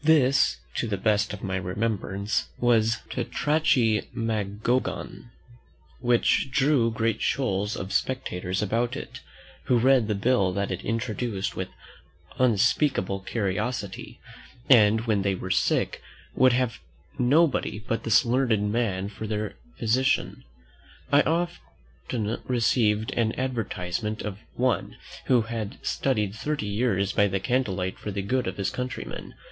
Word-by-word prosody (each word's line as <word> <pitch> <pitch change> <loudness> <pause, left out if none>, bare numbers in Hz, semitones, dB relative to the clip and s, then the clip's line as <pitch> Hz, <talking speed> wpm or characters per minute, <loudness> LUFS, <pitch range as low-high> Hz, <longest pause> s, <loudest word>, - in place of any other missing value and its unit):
This, 140 -4 +4 0.2
to 115 - 0
the 100 -2 -1
best 105 +1 +1
of 105 -1 -7
my 95 -1 -1
remembrance, 100 +2 -2
was 115 -2 +2
TETRACHYMAGOGON, 115 -5 0 0.7
which 120 +2 +2
drew 135 -3 +3
great 115 -1 -1
shoals 105 -6 0
of 95 +1 -5
spectators 95 -7 -1
about 115 +4 0
it, - - -7 0.5
who 125 - +3
read 125 -1 +4
the 105 - 0
bill 100 -3 +2
that 100 +1 -2
it 95 0 -4
introduced 115 -2 -2
with 95 0 -4 0.7
unspeakable 115 -3 +2
curiosity; 100 +1 -3 0.5
and 110 -3 +6
when 110 -3 +1
they 95 -1 0
were 95 0 -5
sick, 90 - +1 0.3
would 130 -1 +5
have 125 -2 0 0.4
nobody 140 -2 +3
but 115 +2 -3
this 115 +3 +4
learned 115 -4 +1
man 100 -5 0
for 110 +1 -7
their 105 -1 -2 0.2
physician. 130 +4 +1 0.7
I 145 +1 +6
once 175 +1 0 0.9
received 110 -3 +2
an 115 -2 +1
advertisement 110 -4 -3
of 105 -2 -5 0.2
one 125 -3 0 0.3
"who 125 -3 +4
had 110 -2 -5
studied 105 -7 0
thirty 145 +3 -3
years 100 -2 0
by 105 -1 +3
candle 120 0 0
light 95 +1 -3
for - - -5
the 100 -1 -3
good 125 +3 0
of 95 - -4
his 100 -1 -1
countrymen." 125 0 -6
110 Hz, 130 wpm, -26 LUFS, 100-125 Hz, 0.9 s, and